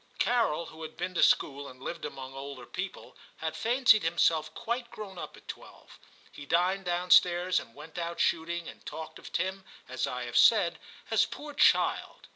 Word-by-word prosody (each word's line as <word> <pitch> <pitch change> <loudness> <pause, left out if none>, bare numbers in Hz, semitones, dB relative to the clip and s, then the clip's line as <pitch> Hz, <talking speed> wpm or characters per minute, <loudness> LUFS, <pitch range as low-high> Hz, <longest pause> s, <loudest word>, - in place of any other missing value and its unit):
Carol, 230 -10 +1
who 160 0 -12
had 160 0 -8
been 180 +2 -3
to - - 0
school, 140 0 +3
and 130 -1 -12
lived 165 +5 -5
among 130 0 -7
older 135 -2 -8
people, 180 +8 -6 0.2
had 160 0 -4
fancied 235 -2 +4
himself 165 -1 +2
quite 235 +1 -3
grown 195 -4 -8
up - - -8
at - - -19
twelve. - - -11 0.3
He 145 - -11
dined 185 +4 +1
down 175 0 -1
stairs 180 +1 +5
and 115 - -12
went 160 +4 -9
out 170 0 -4
shooting, 170 0 0
and - - -11
talked 160 - -8
of - - -11
Tim, 190 +2 -2 0.2
as 130 0 -2
I 125 0 -4
have 120 -1 -2
said, 180 -7 +5 0.3
as 225 - +4
'poor 295 0 -8
child.' 285 - +2
170 Hz, 185 wpm, -29 LUFS, 150-190 Hz, 0.3 s, stairs